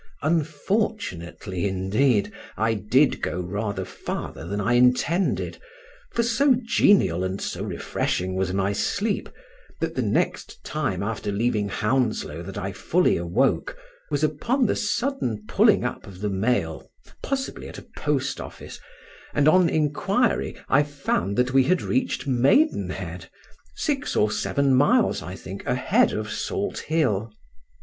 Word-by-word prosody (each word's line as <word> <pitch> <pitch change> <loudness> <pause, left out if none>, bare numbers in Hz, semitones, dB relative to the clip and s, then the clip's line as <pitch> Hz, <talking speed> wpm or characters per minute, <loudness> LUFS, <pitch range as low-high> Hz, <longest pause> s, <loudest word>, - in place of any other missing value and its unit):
Unfortunately, 150 - -1
indeed, 100 +5 +1 0.3
I 110 +3 +2
did 120 +7 +2
go 90 - -2
rather 100 +1 -3
farther 80 -4 -6
than 100 +3 -2
I 105 +4 +1
intended, 125 +9 +2 0.5
for 235 - +1
so 255 +4 +3
genial 205 - +3
and 95 +1 -2
so - - -4
refreshing 95 +1 -2
was 95 -1 -1
my 95 +1 0
sleep, 205 - -1 0.5
that - - -2
the - - -1
next - - -1
time 120 -12 -2
after 105 -1 -3
leaving 105 -1 0
Hounslow 115 +3 0
that - - -8
I - - -3
fully - - +2
awoke 85 0 0 0.3
was 145 0 -1
upon 230 - +1
the - - +1
sudden 235 - -1
pulling - - +4
up - - -4
of 95 -1 -11
the 105 -1 -1
mail 95 -5 -1 0.3
(possibly 270 -1 -3
at - - -10
a - - -10
post - - -1
office), - - -9 0.6
and 145 0 +3
on 180 +1 +5
inquiry 195 - +1
I 140 - +4
found 135 - -2
that 125 +1 +2
we 135 -1 +5
had 185 +6 +2
reached 260 -8 -1
Maidenhead—six 285 - -1
or 105 0 +3
seven 140 +3 +1
miles, 210 - +3
I 90 - -7
think, 95 +1 -8
ahead 145 - +3
of 105 0 -3
Salthill. 130 - -1
125 Hz, 135 wpm, -24 LUFS, -, 0.6 s, on